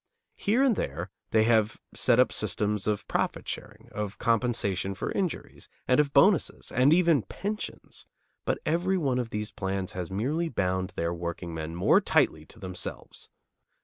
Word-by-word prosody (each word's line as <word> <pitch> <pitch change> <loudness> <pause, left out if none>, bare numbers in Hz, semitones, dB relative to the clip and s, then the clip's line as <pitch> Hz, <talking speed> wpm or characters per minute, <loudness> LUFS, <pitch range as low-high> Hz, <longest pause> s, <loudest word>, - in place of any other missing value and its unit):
Here 230 +7 +2
and 260 -5 +4
there 85 - -3 0.2
they 110 -1 +4
have 110 -2 +2
set - - +3
up - - +4
systems 105 -1 -1
of 105 -1 -1
profit - - -1
sharing, 105 +2 -7
of 105 -2 -4
compensation 110 -5 0
for - - -3
injuries, 185 -4 -3 0.2
and 125 - +4
of 145 -2 +3
bonuses, 165 +6 +3
and 130 +4 +4
even 165 -4 +5
pensions; 205 - -5 0.4
but - - 0
every 180 +4 +1
one 135 -7 +1
of 120 -2 -2
these 105 0 -3
plans 95 -1 -3
has 90 -2 -5
merely 140 - -1
bound 95 -5 -1
their 85 +1 -1
workingmen 85 -2 -5
more 90 - +4
tightly - - +2
to - - -14
themselves. 90 -1 -6
110 Hz, 155 wpm, -28 LUFS, 95-145 Hz, 0.4 s, even